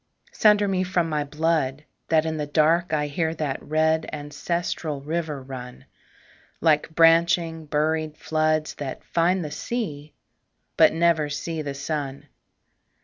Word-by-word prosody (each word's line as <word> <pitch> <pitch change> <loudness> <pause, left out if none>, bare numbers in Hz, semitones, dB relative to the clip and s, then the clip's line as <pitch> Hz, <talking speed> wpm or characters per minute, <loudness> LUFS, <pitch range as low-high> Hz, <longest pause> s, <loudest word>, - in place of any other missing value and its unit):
Sunder 210 -1 +4
me 185 -1 +1
from 180 -2 0
my 150 -1 0
blood 150 -2 -1 0.3
that 160 -1 +3
in 160 -1 -2
the 150 -1 -3
dark 160 +3 +2
I 150 -1 +1
hear 160 +2 -1
that 145 -4 -3
red 160 +1 +1
ancestral 150 +1 -3
river 150 -1 -3
run, 125 -2 -9 0.7
Like 155 -2 +3
branching 165 0 +3
buried 155 +1 0
floods 155 -1 0
that 140 -3 -5
find 175 +1 +1
the 150 - -6
sea 155 -8 -4 0.6
But 160 -1 +6
never 165 -2 +2
see 160 +2 -4
the 140 -2 -5
sun. 140 -1 -4
155 Hz, 135 wpm, -24 LUFS, 150-165 Hz, 0.7 s, But